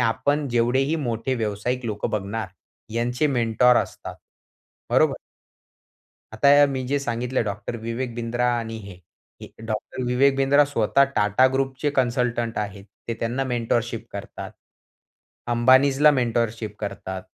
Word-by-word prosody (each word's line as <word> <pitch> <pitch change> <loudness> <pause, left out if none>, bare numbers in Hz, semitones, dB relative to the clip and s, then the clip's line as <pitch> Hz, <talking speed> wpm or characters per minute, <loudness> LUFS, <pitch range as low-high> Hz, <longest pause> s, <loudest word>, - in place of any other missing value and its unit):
आपण 125 +5 0
जेवढेही 125 +6 +1
मोठे 120 -3 -2
व्यावसायिक 115 +2 -2
लोक 105 -1 -2
बघणार, 105 0 -3 0.5
यांचे 120 +4 0
मेंटॉर 125 -2 +3
असतात. - - -3 0.7
बरोबर. - - +3 1.2
आता 140 +6 +6
मी 135 -2 -3
जे 145 +1 +1
सांगितलं 125 -1 -2
डॉक्टर 105 +2 -4
विवेक 115 +2 -4
बिंद्रा 120 +1 -1
आणि 115 -1 -5
हे, 100 -1 -9 0.5
हे - - -8 0.2
डॉक्टर 110 +3 -4
विवेक 135 +3 +3
बिंद्रा 140 +2 +4
स्वतः 140 -1 +2
टाटा 105 +5 +4
ग्रुपचे 135 +2 -1
कन्सल्टंट 120 -2 0
आहेत. 100 -2 -5 0.2
ते 115 - -1
त्यांना 120 +4 -1
मेंटॉरशिप 120 -2 -2
करतात. - - -7 0.9
अंबानींजला 130 +5 +5
मेंटॉरशिप 115 -4 -1
करतात. 95 -2 -5
120 Hz, 120 wpm, -23 LUFS, 115-130 Hz, 1.2 s, आता